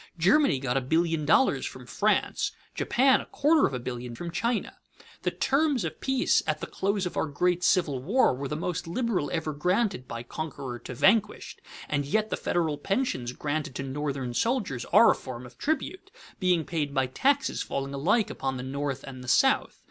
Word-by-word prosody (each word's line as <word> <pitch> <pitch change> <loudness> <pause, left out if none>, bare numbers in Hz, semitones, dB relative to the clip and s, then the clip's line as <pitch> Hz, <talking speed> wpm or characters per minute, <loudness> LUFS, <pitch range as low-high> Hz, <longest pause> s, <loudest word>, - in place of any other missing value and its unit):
Germany 185 - +4
got 130 -1 -1
a - - +1
billion 160 +3 +1
dollars 265 - +4
from - - -7
France, - - 0 0.2
Japan 265 +2 +3
a - - -12
quarter 305 +1 +3
of - - -7
a - - -3
billion 120 -1 -6
from 170 +6 -6
China. 235 +6 -2 0.4
The - - 0
terms 275 - +1
of 160 -1 -6
peace 265 -1 +2
at - - 0
the - - -4
close 200 0 -1
of 180 - -4
our - - +1
great 180 +4 0
Civil 150 -10 +2
War 205 - +3
were 135 +2 -4
the 150 - -3
most 170 +1 -3
liberal 185 - -1
ever 155 +1 -2
granted 180 - 0
by 115 0 -6
conqueror 135 -3 -6
to 125 +2 -8
vanquished; 210 - +1 0.3
and 145 -1 0
yet 215 +10 0
the - - +1
federal 160 -4 -1
pensions 195 - -1
granted 145 0 -3
to 135 - -3
Northern 135 -2 -3
soldiers 195 - -1
are 230 - +6
a - - +3
form 125 -2 -8
of 125 - -15
tribute, 315 +5 -2 0.3
being 180 -5 +2
paid 150 -4 -2
by 135 -1 +3
taxes 270 - +1
falling 135 0 -3
alike 185 +10 +1
upon 135 -1 -3
the 125 - -5
North 140 0 -3
and 130 -2 -9
the - - -10
South. 265 - +3
155 Hz, 190 wpm, -27 LUFS, 135-210 Hz, 0.4 s, are